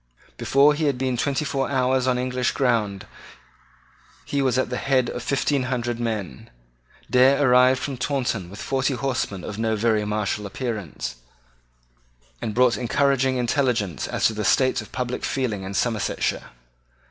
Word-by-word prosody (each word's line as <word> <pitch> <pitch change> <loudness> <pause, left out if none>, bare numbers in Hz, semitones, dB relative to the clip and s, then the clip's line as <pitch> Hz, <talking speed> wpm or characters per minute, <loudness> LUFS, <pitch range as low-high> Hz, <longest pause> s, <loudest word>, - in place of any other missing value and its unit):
Before 140 +2 +4
he 155 +1 -1
had 140 -3 +1
been 130 -1 -1
twenty 140 +4 -1
four 135 -2 -1
hours 130 -1 +1
on 125 -1 +2
English 125 0 -1
ground 110 -7 0 1.2
he 140 - -1
was 130 -2 +1
at 130 - 0
the 125 - -1
head 130 -3 +1
of 125 - -5
fifteen 140 +1 0
hundred 120 -2 -2
men. 110 -1 -4 0.6
Dare 130 +2 +4
arrived 125 +1 +5
from 135 -1 -4
Taunton 125 -8 -2
with 100 +2 -10
forty 135 0 0
horsemen 120 -8 -2
of 105 0 -6
no 110 -1 +1
very 110 0 +1
martial 105 0 -2
appearance, 100 - -5 1.2
and 110 -3 -3
brought 125 -1 +4
encouraging 130 +1 +1
intelligence 120 - 0
as - - -1
to 110 - +3
the 105 0 -3
state 130 +5 +2
of - - -13
public 125 0 -3
feeling 120 -7 -1
in 95 +1 -6
Somersetshire. 110 0 -1
125 Hz, 155 wpm, -23 LUFS, 110-135 Hz, 1.2 s, arrived